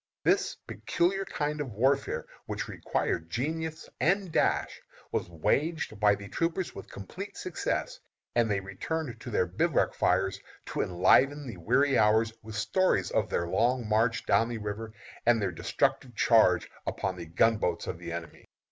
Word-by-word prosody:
This - - +2
peculiar 195 +3 0
kind 150 -2 -2
of 130 -6 -5
warfare, 135 +6 +1 0.2
which - - -3
required 80 - -2
genius 160 - -3
and 190 +2 +2
dash, - - +1 0.3
was - - -2
waged 140 - 0
by 105 -1 +5
the 100 0 -9
troopers 165 - -1
with 95 - -9
complete 180 - -8
success, 185 - -2 0.3
and 120 -2 +2
they 100 -1 +1
returned 145 - -4
to 125 - -7
their 90 - +2
bivouac 90 +1 +1
fires 95 +1 +1 0.3
to - - -2
enliven 135 +11 +3
the 115 -7 -7
weary 135 +10 +3
hours 110 +1 +4
with 110 -1 -9
stories 150 - +1
of - - +1
their 85 - 0
long 120 +6 +1
march 115 +2 +2
down 115 +1 +3
the 120 - -3
river, 105 +1 -5 0.4
and 120 -1 +5
their 100 -3 0
destructive 120 +7 -1
charge 110 -8 +4 0.2
upon 95 -1 -2
the 85 -2 -8
gunboats 90 0 +2
of - - -5
the 85 -1 -6
enemy. 85 0 -7
115 Hz, 155 wpm, -29 LUFS, 95-145 Hz, 0.4 s, by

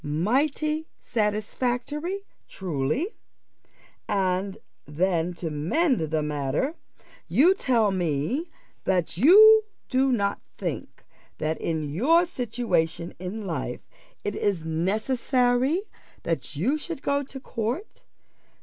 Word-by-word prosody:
Mighty 280 - 0
satisfactory, 245 - -1 0.3
truly! 180 - -2 1.0
And 190 0 0 0.3
then, 170 +2 0
to 165 -2 -4
mend 255 - +1
the 160 -1 -1
matter, 150 - -1 0.5
you 345 +8 +5
tell 235 - +2
me 180 - -1 0.4
that 180 -4 +1
you 425 - +8 0.2
do 265 0 +3
not 200 -4 0 0.2
think - - -5 0.3
that 155 +1 -2
in 160 -2 -1
your 260 - +3
situation 225 - -1
in 195 +4 -5
life 135 -8 -4 0.4
it 205 - -2
is 190 -7 0
necessary 245 - +1 0.4
that 165 -2 -3
you 250 - +1
should 320 -2 -6
go 280 0 +1
to 270 -1 -8
court. 250 - -4
215 Hz, 105 wpm, -26 LUFS, 165-275 Hz, 1.0 s, you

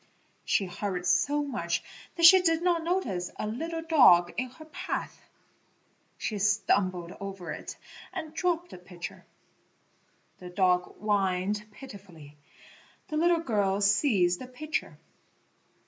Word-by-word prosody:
She 195 - +1
hurried 180 0 -4
so 280 +13 +2
much 275 -4 -2 0.3
that 335 - +3
she 375 +2 +10
did 330 -1 +1
not 345 -2 +2
notice 280 - -1
a - - -3
little 325 +10 -4
dog 185 - +5
in 255 +2 -2
her 315 +5 -14
path; 310 - -6 0.9
she 210 -2 -3
stumbled 190 -3 +1
over 195 -3 -6
it - - -7 0.3
and 315 -1 -6
dropped 350 0 -1
the - - -10
pitcher. 180 -1 -9 1.1
The 180 - -9
dog 180 -1 +1
whined 205 0 0
pitifully; 190 - -13 0.7
the 305 - -2
little 340 +1 +3
girl 205 -8 0
seized 200 -4 +3
the 255 - -7
pitcher. 305 +5 -4
210 Hz, 125 wpm, -28 LUFS, -, 1.1 s, she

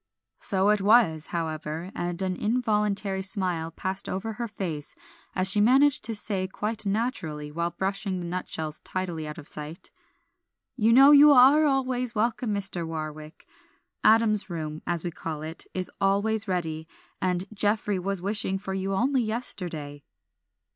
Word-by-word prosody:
So 195 +1 +1
it 210 -1 +3
was, 195 -7 +4
however, 160 +1 -4
and 175 0 -4
an 185 -1 -1
involuntary 210 -3 0
smile 185 -4 -1
passed 190 +3 -4
over 220 +4 -3
her 235 +2 -4
face 170 -8 -4 0.4
as 185 0 +5
she 205 +2 +6
managed 265 +5 +4
to 225 0 -2
say 195 -2 -2
quite 210 +2 -3
naturally, 175 - -3
while 170 +2 -1
brushing 190 +1 -2
the 175 - -5
nutshells 160 -3 -3
tidily 175 -4 -4
out 150 - -7
of 150 - -9
sight 150 +3 -8 0.8
"You 230 -3 +2
know 270 +4 +8
you 295 +1 +8
are 275 +4 +6
always 255 -3 0
welcome, 230 +1 0
Mr. 195 -4 -1
Warwick. 155 -1 -7 0.6
'Adam's 215 -2 +4
Room,' 155 -2 -5
as 170 -2 0
we 175 - -3
call 155 -2 -6
it, 160 +1 -6
is 185 -1 -3
always 205 +3 +1
ready, 160 -4 -3 0.3
and 180 0 0
Geoffrey 205 -1 +1
was 195 0 -2
wishing 200 -1 0
for 195 0 -6
you 195 0 -2
only 260 +5 +1
yesterday." 175 - -3
190 Hz, 150 wpm, -26 LUFS, 170-220 Hz, 0.8 s, know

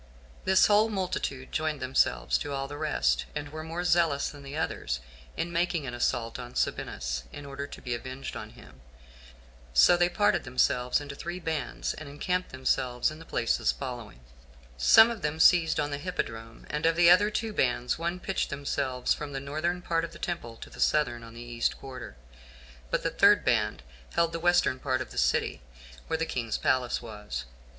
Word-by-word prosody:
This 190 0 +6
whole 210 +1 +4
multitude 185 -9 -3
joined 155 -2 -1
themselves 130 0 +1
to 145 - -4
all 135 0 -2
the 145 - -7
rest, 65 - +1
and 145 -1 -4
were 155 +1 -6
more 165 +2 -4
zealous 165 -5 +2
than 145 - -12
the 140 +2 -7
others 60 - -2 0.4
in 170 +1 -2
making 170 -3 0
an 120 - -5
assault 120 -1 -1
on 120 0 -8
Sabinus, 60 0 -2
in 145 - -9
order 140 0 -5
to - - -10
be 125 - -2
avenged 130 +3 -6
on - - -6
him; 65 - -16 0.9
so 60 - +7
they 175 0 +3
parted 205 +3 +2
themselves 125 0 +2
into 145 -1 -7
three 175 +5 -5
bands, 160 -3 -2
and 155 -2 -9
encamped 180 +6 -2
themselves 130 0 0
in 155 - -10
the 165 - -11
places 115 -6 +1
following:some 60 - +1
of 225 -4 -6
them 150 0 -2
seized 165 -1 +5
on 145 0 -1
the 140 - -3
hippodrome 115 -9 -5
and 150 +2 +1
of 165 - +3
the 170 0 +7
other 200 +4 +6
two 220 0 -2
bands, 125 -3 +1
one 170 +2 -2
pitched 190 +1 -2
themselves 135 -2 -1
from 145 -2 -6
the 135 - -2
northern 155 +6 -2
part 165 -1 0
of 165 0 -5
the - - -10
temple 120 -10 -4
to - - -10
the - - -13
southern, 120 -6 +2
on 115 0 -11
the 120 - -8
east 120 -1 -1
quarter; 130 - -9 0.7
but - - 0
the - - 0
third - - +5
band - - +1 0.3
held 170 -1 +3
the 165 - -2
western 175 -6 +3
part 130 -1 0
of 130 - -6
the - - -10
city, - - +1 0.5
where 160 - 0
the 165 - 0
king's 115 -7 -2
palace 130 -2 +1
was. 105 - -6
140 Hz, 190 wpm, -28 LUFS, 120-165 Hz, 0.9 s, so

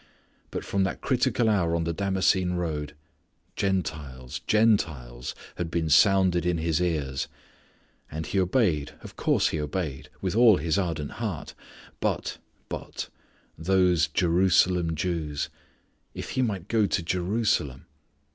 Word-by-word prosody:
But - - -5
from 100 -1 +1
that 95 - -2
critical 120 - +1
hour 90 -6 +2
on 85 - 0
the 85 +1 -1
Damascene 95 -1 +1
road 80 -5 -3 0.6
"Gentiles 80 -10 -2
Gentiles" 80 - +1 0.2
had 85 - -2
been 80 -2 -1
sounded 95 0 +5
in 90 -1 +1
his 80 0 0
ears. 75 -7 -1 0.8
And 80 +2 -4
he 100 - 0
obeyed, 90 - +1
of - - -11
course - - +2
he 80 - -2
obeyed, 75 -3 -4
with 95 0 -2
all 115 -4 +7
his 80 +4 0
ardent 80 -6 -2
heart. - - -4 0.5
But, - - -2 0.3
but - - -6 0.5
those 90 -2 +3
Jerusalem 90 0 +3
Jews! 80 -3 -2 0.7
If - - -6
he 130 - 0
might 100 -7 -1
go 110 -3 +2
to 95 - 0
Jerusalem! 90 - 0
85 Hz, 130 wpm, -27 LUFS, 80-95 Hz, 0.8 s, all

